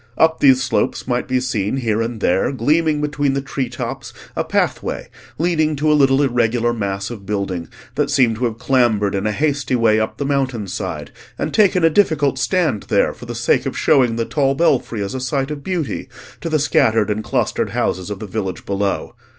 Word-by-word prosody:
Up 160 Hz, 0 st, +3 dB
these 130 Hz, -2 st, +5 dB
slopes 125 Hz, -, -1 dB
might 125 Hz, -1 st, -1 dB
be 130 Hz, -1 st, +1 dB
seen 120 Hz, -2 st, -1 dB
here 115 Hz, -4 st, 0 dB
and 115 Hz, -1 st, -4 dB
there, 95 Hz, +6 st, +2 dB
gleaming 150 Hz, +4 st, +1 dB
between 145 Hz, -2 st, 0 dB
the 140 Hz, -, 0 dB
tree 135 Hz, -2 st, -3 dB
tops, 120 Hz, -, -5 dB, 0.2 s
a -, -, 0 dB
pathway -, -, -1 dB, 0.3 s
leading 155 Hz, -2 st, +1 dB
to 150 Hz, +2 st, +1 dB
a -, -, +5 dB
little 135 Hz, -1 st, +4 dB
irregular 120 Hz, -2 st, +1 dB
mass 100 Hz, -1 st, -3 dB
of 110 Hz, -4 st, -8 dB
building 95 Hz, -4 st, -3 dB, 0.3 s
that 145 Hz, -1 st, 0 dB
seemed 125 Hz, -6 st, +3 dB
to 125 Hz, -, 0 dB
have 115 Hz, -2 st, -2 dB
clambered 120 Hz, -5 st, +2 dB
in 100 Hz, +2 st, -1 dB
a -, -, +1 dB
hasty 140 Hz, +1 st, 0 dB
way 110 Hz, -2 st, +3 dB
up 110 Hz, -, -2 dB
the 140 Hz, -, -2 dB
mountain 135 Hz, -6 st, -1 dB
side, -, -, -5 dB, 0.3 s
and -, -, -3 dB
taken 190 Hz, -5 st, +3 dB
a 165 Hz, -, +6 dB
difficult 150 Hz, -8 st, +2 dB
stand 140 Hz, -, 0 dB
there -, -, +2 dB
for -, -, -12 dB
the -, -, -5 dB
sake -, -, +1 dB
of -, -, -4 dB
showing 125 Hz, -4 st, +3 dB
the 115 Hz, 0 st, -1 dB
tall 135 Hz, 0 st, +1 dB
belfry 125 Hz, -9 st, +1 dB
as 100 Hz, -, -4 dB
a 130 Hz, -, -3 dB
sight 135 Hz, +2 st, -1 dB
of 145 Hz, -2 st, -6 dB
beauty 170 Hz, -8 st, -3 dB, 0.3 s
to 165 Hz, -, -4 dB
the 155 Hz, -, +2 dB
scattered 115 Hz, -7 st, +2 dB
and 110 Hz, +1 st, -2 dB
clustered -, -, -1 dB
houses 95 Hz, +2 st, -1 dB
of 105 Hz, -, -4 dB
the 110 Hz, -, -7 dB
village 95 Hz, -2 st, -4 dB
below. 100 Hz, 0 st, -2 dB
125 Hz, 205 wpm, -19 LUFS, 110-145 Hz, 0.3 s, a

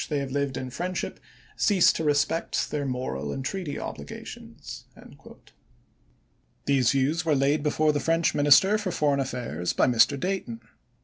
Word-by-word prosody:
26, -, -, -6 dB
they 150 Hz, -2 st, 0 dB
have 135 Hz, -1 st, -4 dB
lived 140 Hz, -1 st, -1 dB
in 130 Hz, -1 st, -5 dB
friendship 180 Hz, +7 st, -4 dB, 0.4 s
cease 195 Hz, -5 st, +4 dB
to 160 Hz, -, -3 dB
respect 145 Hz, +2 st, 0 dB
their 145 Hz, -1 st, -2 dB
i863. -, -, -2 dB
moral 75 Hz, -, -3 dB
and 135 Hz, -, -5 dB
treaty 175 Hz, -2 st, -4 dB
obligations." 70 Hz, 0 st, -9 dB, 1.8 s
These 130 Hz, -3 st, +3 dB
views 140 Hz, +5 st, +1 dB
were 160 Hz, -2 st, +2 dB
laid 140 Hz, +2 st, +2 dB
before 155 Hz, +1 st, +2 dB
the 145 Hz, -, 0 dB
French 165 Hz, +4 st, +1 dB
Minis 145 Hz, -2 st, +7 dB
ter 205 Hz, +3 st, 0 dB
for 210 Hz, -3 st, -3 dB
Foreign 145 Hz, -4 st, +1 dB
Affairs 120 Hz, -, -3 dB
by -, -, +3 dB
Mr. 125 Hz, +3 st, +3 dB
Dayton. 180 Hz, -11 st, -3 dB
140 Hz, 165 wpm, -26 LUFS, 130-160 Hz, 1.8 s, Minis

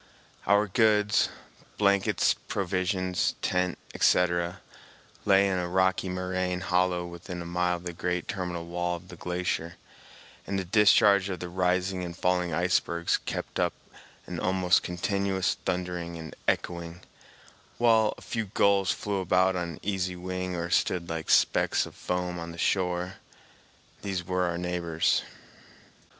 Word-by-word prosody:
Our 100 Hz, +1 st, +4 dB
goods—blankets, 105 Hz, -2 st, +1 dB
provisions, 90 Hz, -1 st, 0 dB
tent, 90 Hz, -1 st, 0 dB, 0.2 s
etc.—lay 90 Hz, +2 st, +1 dB
in 95 Hz, -2 st, 0 dB
a 90 Hz, -, -2 dB
rocky 95 Hz, +1 st, +1 dB
moraine 90 Hz, 0 st, -2 dB
hollow 90 Hz, -1 st, +1 dB
within 85 Hz, +1 st, -7 dB
a 85 Hz, -, -6 dB
mile 90 Hz, +1 st, 0 dB
of 85 Hz, -, -9 dB
the 90 Hz, -1 st, -5 dB
great 90 Hz, 0 st, -2 dB
terminal 90 Hz, -3 st, -4 dB
wall 90 Hz, +1 st, -2 dB
of 90 Hz, +1 st, -12 dB
the 90 Hz, -, -9 dB
glacier, 90 Hz, -1 st, -3 dB, 0.7 s
and 100 Hz, -, -1 dB
the 95 Hz, -, -2 dB
discharge 100 Hz, 0 st, +5 dB
of 90 Hz, -, -4 dB
the 90 Hz, -, -5 dB
rising 90 Hz, +1 st, 0 dB
and 85 Hz, -1 st, -6 dB
falling 90 Hz, -1 st, +1 dB
icebergs 85 Hz, 0 st, +1 dB
kept -, -, -4 dB
up -, -, +1 dB, 0.5 s
an 90 Hz, -1 st, -5 dB
almost 95 Hz, -1 st, +3 dB
continuous 95 Hz, +1 st, -1 dB
thundering 90 Hz, -2 st, -3 dB
and 80 Hz, -1 st, -8 dB
echoing, 85 Hz, 0 st, -2 dB, 0.8 s
while 110 Hz, -2 st, +4 dB
a -, -, -14 dB
few 110 Hz, -2 st, -3 dB
gulls 100 Hz, -1 st, +2 dB
flew 100 Hz, -1 st, -1 dB
about 95 Hz, +1 st, +2 dB
on 85 Hz, -3 st, -4 dB
easy 95 Hz, -2 st, -1 dB
wing 90 Hz, 0 st, -4 dB
or 85 Hz, 0 st, -3 dB
stood 85 Hz, -2 st, +1 dB
like 80 Hz, -1 st, -4 dB
specks -, -, +3 dB
of -, -, -11 dB
foam 90 Hz, -1 st, -3 dB
on 85 Hz, 0 st, -6 dB
the 85 Hz, -, -10 dB
shore. 90 Hz, +1 st, 0 dB, 0.8 s
These 95 Hz, -3 st, -3 dB
were 90 Hz, 0 st, 0 dB
our 85 Hz, -1 st, -1 dB
neighbors. 85 Hz, -2 st, 0 dB
90 Hz, 135 wpm, -28 LUFS, 85-95 Hz, 0.8 s, discharge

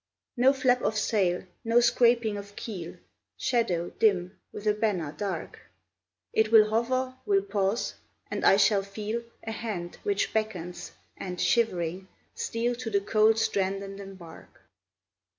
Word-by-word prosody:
No 255 Hz, +2 st, +5 dB
flap 255 Hz, -2 st, +2 dB
of 215 Hz, -, 0 dB
sail, 190 Hz, -5 st, +1 dB, 0.2 s
no 230 Hz, +1 st, +4 dB
scraping 235 Hz, -2 st, +3 dB
of 205 Hz, 0 st, -8 dB
keel: 180 Hz, -7 st, -6 dB, 0.4 s
Shadow, 185 Hz, -9 st, 0 dB
dim, 190 Hz, -3 st, +2 dB, 0.2 s
with 210 Hz, -, -8 dB
a 210 Hz, -, +4 dB
banner 205 Hz, -8 st, -1 dB
dark, 200 Hz, -2 st, -4 dB, 0.7 s
It 220 Hz, 0 st, +2 dB
will 215 Hz, -1 st, +7 dB
hover, 255 Hz, +3 st, 0 dB
will 195 Hz, -1 st, +3 dB
pause, 200 Hz, +2 st, -1 dB, 0.4 s
and -, -, -3 dB
I 195 Hz, -, +6 dB
shall 200 Hz, 0 st, +4 dB
feel 210 Hz, +3 st, -4 dB, 0.2 s
A 225 Hz, -, -4 dB
hand 200 Hz, -7 st, -5 dB
which 405 Hz, -1 st, 0 dB
beckons, 185 Hz, -6 st, -3 dB, 0.2 s
and, 180 Hz, -2 st, -6 dB
shivering, 185 Hz, -5 st, +1 dB, 0.3 s
steal 235 Hz, +1 st, -1 dB
To 240 Hz, -2 st, -4 dB
the 200 Hz, -2 st, +1 dB
cold 215 Hz, +2 st, +3 dB
strand 195 Hz, -3 st, 0 dB
and 195 Hz, 0 st, -8 dB
embark. 190 Hz, -4 st, -12 dB
210 Hz, 140 wpm, -28 LUFS, 195-230 Hz, 0.7 s, will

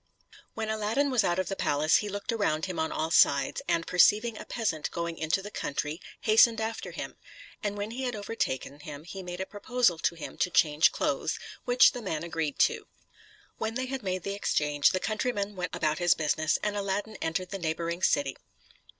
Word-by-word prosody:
When 220 Hz, -1 st, -3 dB
Aladdin 220 Hz, +6 st, 0 dB
was 245 Hz, -4 st, +3 dB
out 175 Hz, -2 st, +1 dB
of 185 Hz, -, 0 dB
the 195 Hz, -, -2 dB
palace, 150 Hz, -3 st, +3 dB
he 210 Hz, -, -2 dB
looked 205 Hz, +2 st, -3 dB
around 190 Hz, -8 st, 0 dB
him 185 Hz, -2 st, -4 dB
on 160 Hz, -, 0 dB
all 160 Hz, +1 st, -2 dB
sides, 140 Hz, -3 st, +4 dB
and 165 Hz, 0 st, +1 dB
perceiving 215 Hz, +6 st, +4 dB
a -, -, -8 dB
peasant 165 Hz, -10 st, -2 dB
going 170 Hz, -1 st, -3 dB
into 160 Hz, +5 st, 0 dB
the 205 Hz, -, -7 dB
country, 150 Hz, +1 st, -3 dB, 0.2 s
hastened 225 Hz, +1 st, +5 dB
after 225 Hz, +1 st, -3 dB
him; -, -, -7 dB, 0.4 s
and 205 Hz, -1 st, -2 dB
when 205 Hz, +2 st, -3 dB
he 250 Hz, +3 st, -5 dB
had 250 Hz, -2 st, -2 dB
overtaken 145 Hz, -, -3 dB
him, 150 Hz, 0 st, -9 dB
made 180 Hz, -2 st, -6 dB
a 190 Hz, -, -2 dB
proposal 205 Hz, -3 st, +1 dB
to 170 Hz, -, 0 dB
him 165 Hz, -, -8 dB
to -, -, +2 dB
change 150 Hz, -2 st, +4 dB
clothes, -, -, -1 dB, 0.3 s
which 245 Hz, 0 st, +6 dB
the 245 Hz, -, -6 dB
man 160 Hz, -7 st, -3 dB
agreed 165 Hz, -4 st, -2 dB
to. -, -, +2 dB, 0.7 s
When 220 Hz, +1 st, -2 dB
they 255 Hz, +1 st, -1 dB
had 265 Hz, 0 st, -4 dB
made 185 Hz, -3 st, -2 dB
the 200 Hz, -, -3 dB
exchange, 150 Hz, -7 st, +2 dB
the 185 Hz, -, 0 dB
countryman 210 Hz, -1 st, -2 dB
went 180 Hz, -1 st, -3 dB
about 155 Hz, 0 st, 0 dB
his 175 Hz, -1 st, +4 dB
business, 155 Hz, 0 st, +1 dB
and 210 Hz, -1 st, 0 dB
Aladdin 205 Hz, +2 st, -2 dB
entered 170 Hz, +3 st, -2 dB
the 195 Hz, -, -4 dB
neighboring 170 Hz, +1 st, -2 dB
city. 140 Hz, -6 st, +2 dB
185 Hz, 195 wpm, -29 LUFS, 160-215 Hz, 0.7 s, which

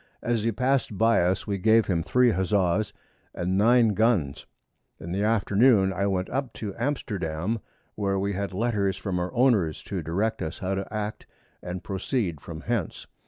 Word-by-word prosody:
As 120 Hz, -2 st, 0 dB
he 115 Hz, +2 st, +1 dB
pass'd 125 Hz, -2 st, 0 dB
by 115 Hz, 0 st, +4 dB
us, 90 Hz, +2 st, 0 dB
we 100 Hz, -2 st, -2 dB
gave 110 Hz, +3 st, +4 dB
him 85 Hz, -4 st, 0 dB
3 125 Hz, +7 st, +3 dB
Huzza's 95 Hz, +1 st, +1 dB, 0.4 s
and 90 Hz, +2 st, -1 dB
9 115 Hz, +3 st, +5 dB
Guns. 105 Hz, -, +1 dB, 0.5 s
In 85 Hz, -, -7 dB
the 95 Hz, +3 st, -1 dB
Afternoon 105 Hz, -1 st, +3 dB
I 100 Hz, +2 st, 0 dB
went 95 Hz, -1 st, -1 dB
up 135 Hz, -3 st, -2 dB
to 105 Hz, -3 st, -5 dB
Amsterdam, 100 Hz, -, -2 dB, 0.3 s
where 100 Hz, -2 st, -1 dB
we 100 Hz, +1 st, -1 dB
had 100 Hz, +1 st, -3 dB
Letters 100 Hz, -2 st, 0 dB
from 95 Hz, -1 st, -2 dB
our 90 Hz, 0 st, -2 dB
Owners, 110 Hz, -, +2 dB
to 95 Hz, -3 st, -4 dB
direct 95 Hz, +8 st, -1 dB
us 80 Hz, +2 st, -4 dB
how 95 Hz, 0 st, -2 dB
to 95 Hz, +1 st, -4 dB
act 105 Hz, 0 st, -4 dB, 0.3 s
and 90 Hz, 0 st, -6 dB
proceed 95 Hz, -, -2 dB
from 80 Hz, -1 st, -8 dB
hence. 115 Hz, -6 st, -3 dB
100 Hz, 170 wpm, -26 LUFS, 90-115 Hz, 0.5 s, 9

